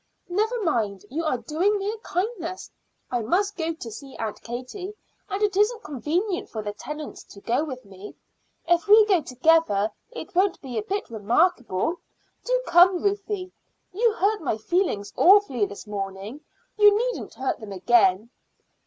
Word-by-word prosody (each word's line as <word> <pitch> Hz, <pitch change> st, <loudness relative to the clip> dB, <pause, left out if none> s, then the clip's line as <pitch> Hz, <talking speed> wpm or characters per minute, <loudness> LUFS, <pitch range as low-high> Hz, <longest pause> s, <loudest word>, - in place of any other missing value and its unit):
"Never 435 Hz, +6 st, 0 dB
mind; 210 Hz, -, -1 dB
you 320 Hz, +4 st, -2 dB
are 280 Hz, -5 st, +1 dB
doing 330 Hz, -, 0 dB
me 400 Hz, +1 st, -2 dB
a 450 Hz, -, -6 dB
kindness. 370 Hz, -4 st, -4 dB, 0.4 s
I 245 Hz, -1 st, 0 dB
must 385 Hz, -, 0 dB
go 325 Hz, -1 st, -1 dB
to 235 Hz, -8 st, -8 dB
see 270 Hz, +5 st, -10 dB
Aunt 220 Hz, -2 st, -4 dB
Katie, 255 Hz, -, -6 dB, 0.3 s
and 395 Hz, +2 st, -2 dB
it 415 Hz, -2 st, +1 dB
isn't 430 Hz, +3 st, +2 dB
convenient 345 Hz, -, -2 dB
for 215 Hz, -2 st, -5 dB
the 205 Hz, 0 st, -4 dB
Tennants 300 Hz, +7 st, -7 dB
to 200 Hz, -, -14 dB
go 235 Hz, +8 st, 0 dB
with 260 Hz, -5 st, -7 dB
me. 195 Hz, +1 st, -11 dB, 0.5 s
If 345 Hz, +3 st, +2 dB
we 425 Hz, +1 st, +8 dB
go 380 Hz, -5 st, +3 dB
together 255 Hz, -6 st, +2 dB, 0.2 s
it 475 Hz, -, -9 dB
won't 375 Hz, +1 st, +2 dB
be 260 Hz, -4 st, -8 dB
a -, -, -2 dB
bit 395 Hz, -, -4 dB
remarkable. 240 Hz, -, +1 dB, 0.5 s
Do -, -, 0 dB
come, 355 Hz, +1 st, +5 dB
Ruthie. 400 Hz, -2 st, -2 dB, 0.4 s
You 450 Hz, +3 st, +2 dB
hurt 420 Hz, 0 st, +1 dB
my 260 Hz, -8 st, -1 dB
feelings 220 Hz, -, -1 dB
awfully 360 Hz, -, +5 dB
this 200 Hz, -, -10 dB
morning; 200 Hz, +5 st, -6 dB, 0.4 s
you 415 Hz, 0 st, +7 dB
needn't -, -, -3 dB
hurt 265 Hz, -, -2 dB
them 215 Hz, -3 st, -9 dB
again." 200 Hz, +1 st, +3 dB
325 Hz, 160 wpm, -25 LUFS, -, 0.5 s, we